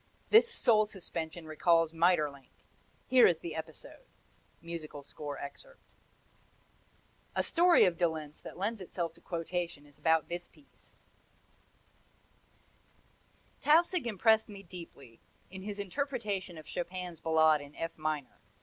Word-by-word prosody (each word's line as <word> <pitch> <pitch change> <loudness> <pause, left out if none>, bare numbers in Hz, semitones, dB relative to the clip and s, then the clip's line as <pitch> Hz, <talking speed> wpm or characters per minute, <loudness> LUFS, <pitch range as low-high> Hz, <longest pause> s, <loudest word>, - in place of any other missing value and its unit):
This 455 +2 +7
soul 215 - +4
suspension 170 -4 -6
recalls 165 +1 +2
Maeterlinck. 155 -5 +1 0.6
Here 255 -1 +7
is 175 - +2
the 165 0 -6
episode: 160 - -8 0.5
[Musical 160 -4 -7
score 145 0 -7
excerpt] - - -10 1.6
A - - +2
story 350 0 +5
of 170 -2 0
de 175 - +4
Lenz 155 -2 -8
that - - -10
lends 205 +3 -2
itself 170 -2 -4
to 170 - -16
quotation 170 -3 -4
is 145 -1 -21
about 160 -1 +3
this 175 0 -5
piece: 285 - -23 2.6
Tausig 330 -1 +4
impressed 220 +1 +3
me 200 -1 -10
deeply 165 -10 -12 0.3
in 190 0 -8
his 205 +1 -5
interpretation 205 - -3
of 155 - -10
Chopin's 180 -1 -5
Ballade 160 -2 +4
in 145 +1 -12
F 165 0 -4
minor. 155 -3 -3
170 Hz, 125 wpm, -32 LUFS, 160-205 Hz, 2.6 s, This